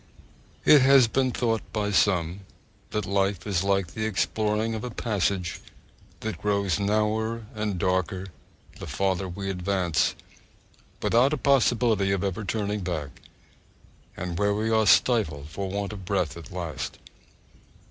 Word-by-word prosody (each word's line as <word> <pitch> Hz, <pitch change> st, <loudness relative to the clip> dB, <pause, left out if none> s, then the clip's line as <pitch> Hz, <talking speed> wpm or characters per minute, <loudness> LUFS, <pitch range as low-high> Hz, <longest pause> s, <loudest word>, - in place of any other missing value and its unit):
It 150 Hz, -2 st, +8 dB
has 135 Hz, -2 st, +6 dB
been 130 Hz, +3 st, +1 dB
thought 115 Hz, -3 st, 0 dB
by 105 Hz, -1 st, -1 dB
some 90 Hz, -2 st, +2 dB, 0.5 s
that 105 Hz, -2 st, -2 dB
life 100 Hz, -1 st, 0 dB
is 95 Hz, -4 st, 0 dB
like 95 Hz, -3 st, 0 dB
the 110 Hz, -, -2 dB
exploring 110 Hz, +1 st, 0 dB
of 110 Hz, -, -4 dB
a 125 Hz, -, -3 dB
passage 100 Hz, -6 st, -1 dB, 0.6 s
that 110 Hz, -1 st, -4 dB
grows 100 Hz, -2 st, +1 dB
narrower 110 Hz, +2 st, 0 dB
and 105 Hz, -3 st, -2 dB
darker 95 Hz, +1 st, -1 dB, 0.5 s
the -, -, -7 dB
farther 95 Hz, -1 st, -1 dB
we 95 Hz, +3 st, -5 dB
advance, 90 Hz, -3 st, 0 dB, 0.9 s
without 130 Hz, +5 st, +4 dB
a -, -, 0 dB
possibility 120 Hz, -7 st, +2 dB
of 100 Hz, 0 st, 0 dB
ever 100 Hz, +2 st, -2 dB
turning 105 Hz, 0 st, -2 dB
back, 80 Hz, -7 st, -5 dB, 1.0 s
and 85 Hz, -2 st, -4 dB
where 100 Hz, 0 st, +2 dB
we 110 Hz, +2 st, -1 dB
are 110 Hz, -1 st, +3 dB
stifled 75 Hz, -, +3 dB
for 95 Hz, +4 st, -4 dB
want 100 Hz, +1 st, -3 dB
of 100 Hz, -2 st, -8 dB
breath 90 Hz, -5 st, -1 dB
at 85 Hz, -2 st, -10 dB
last. 85 Hz, -7 st, -5 dB
100 Hz, 140 wpm, -26 LUFS, 95-110 Hz, 1.0 s, It